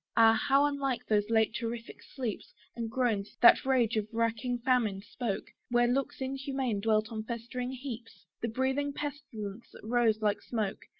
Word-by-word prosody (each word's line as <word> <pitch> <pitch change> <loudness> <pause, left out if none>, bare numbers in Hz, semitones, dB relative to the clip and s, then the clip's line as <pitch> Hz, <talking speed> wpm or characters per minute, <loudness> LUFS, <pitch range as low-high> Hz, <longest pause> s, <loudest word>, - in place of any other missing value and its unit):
Ah! 225 -1 +8
how 275 +5 +3
unlike 280 -3 -1
those 210 -1 +1
late 220 -1 +3
terrific 230 0 -5
sleeps! 245 -7 -5 0.2
And 230 -1 -3
groans, 225 -5 -1
that 240 - +8
rage 240 -4 +3
of 215 -1 0
racking 230 +2 0
famine 225 -7 +2
spoke, 215 -1 -4 0.2
Where 240 0 +4
looks 270 +2 -1
inhuman 265 -4 -2
dwelt 215 +1 +1
on 220 -1 -3
festering 240 +2 -4
heaps! 250 -3 -8 0.2
The 235 - 0
breathing 265 +4 0
pestilence 240 -8 -6
that - - -13
rose 230 -2 +3
like 210 -2 +1
smoke! 215 -5 -3
235 Hz, 160 wpm, -31 LUFS, 220-260 Hz, 0.2 s, Ah